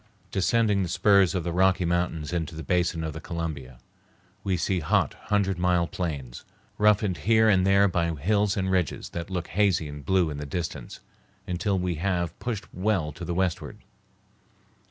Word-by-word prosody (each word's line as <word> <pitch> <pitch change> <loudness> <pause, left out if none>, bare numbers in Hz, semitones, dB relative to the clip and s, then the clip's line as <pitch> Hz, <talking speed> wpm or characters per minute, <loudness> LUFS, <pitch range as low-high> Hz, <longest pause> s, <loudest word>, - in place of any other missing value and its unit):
Descending 105 +1 +2
the 90 - -2
spurs 95 +1 +4
of 90 - -1
the 85 - -2
Rocky 95 +1 +2
Mountains 85 -3 -1
into 85 -1 -3
the 80 - -6
basin 85 0 0
of 80 -1 -4
the 80 - -7
Columbia, 75 -7 -5 0.7
we 95 -2 0
see 95 0 0
hot, 75 - +1
hundred 100 -3 0
mile 90 -1 +2
plains, 70 -9 -5 0.4
roughened 105 -3 +3
here 110 +4 +4
the 95 - +2
there 100 +1 +4
by 85 -2 0
hills 100 +6 +1
and 95 -1 0
ridges 90 -5 -1
that 85 +2 -6
look 90 -3 -4
hazy 95 -5 +1
and 75 0 -8
blue 90 0 +2
in 75 - -5
the 75 - -5
distance, 85 +3 -5 0.4
until 95 +2 -1
we 90 -2 -2
have 90 -3 -1
pushed 110 -4 -4
well 90 -5 0
to 80 +4 -10
the 85 0 -3
westward. 90 -2 -2
90 Hz, 175 wpm, -26 LUFS, 85-95 Hz, 0.7 s, spurs